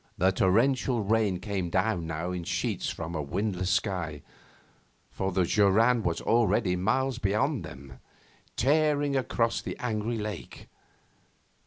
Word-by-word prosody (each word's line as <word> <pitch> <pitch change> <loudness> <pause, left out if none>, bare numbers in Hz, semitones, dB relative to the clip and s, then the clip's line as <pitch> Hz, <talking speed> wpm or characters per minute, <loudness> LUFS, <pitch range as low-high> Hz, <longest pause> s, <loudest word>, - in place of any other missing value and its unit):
The 95 +2 +3
torrential 120 +5 +2
rain 105 -3 +1
came 95 -2 -3
down 95 -2 0
in 85 +2 -3
sheets - - -2
now - - -5
from 85 0 -5
a 80 - -2
windless 95 +4 -2
sky, 90 -6 -1 0.9
for 95 0 -2
the 95 0 +2
joran 110 +6 +3
was 85 -5 -1
already 115 -4 +2
miles 120 +7 0
beyond 120 +7 0
them, 65 0 -11 0.6
tearing 145 +1 +2
across 120 -3 0
the - - -6
angry 115 -1 -2
lake. 105 -1 -7
105 Hz, 130 wpm, -28 LUFS, 90-120 Hz, 0.9 s, The